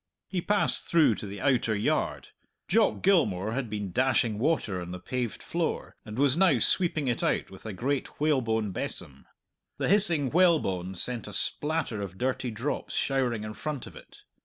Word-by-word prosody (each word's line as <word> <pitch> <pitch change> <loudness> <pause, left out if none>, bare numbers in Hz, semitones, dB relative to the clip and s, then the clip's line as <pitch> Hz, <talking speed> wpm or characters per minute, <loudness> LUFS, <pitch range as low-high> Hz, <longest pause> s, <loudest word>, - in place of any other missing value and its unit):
He 185 -2 -2
passed 205 +3 +2
through 160 -8 +4
to 105 - -6
the 100 +1 -7
outer 125 -5 +2
yard. 100 - -1 0.4
Jock 220 +2 +2
Gilmour 110 - +2
had 125 -1 -3
been 105 -3 -4
dashing 120 -1 +2
water 115 - 0
on 90 - -7
the 90 0 -6
paved 120 +4 -4
floor, - - -3
and 105 +1 -8
was 140 0 +4
now 175 -6 +4
sweeping 155 - +1
it 120 -2 0
out - - 0
with 95 +3 -10
a - - -3
great 135 +7 -3
whalebone 115 -8 +1
besom. 70 -6 -6 0.5
The - - -1
hissing 170 -9 +5
whalebone 120 - +2
sent 120 +5 -3
a 105 - -8
splatter 140 - -1
of 95 -2 -6
dirty 130 +1 -1
drops 115 +6 -4
showering 125 -5 0
in 110 0 -5
front 150 +1 -5
of - - -12
it. - - -15
125 Hz, 175 wpm, -28 LUFS, 105-150 Hz, 0.5 s, hissing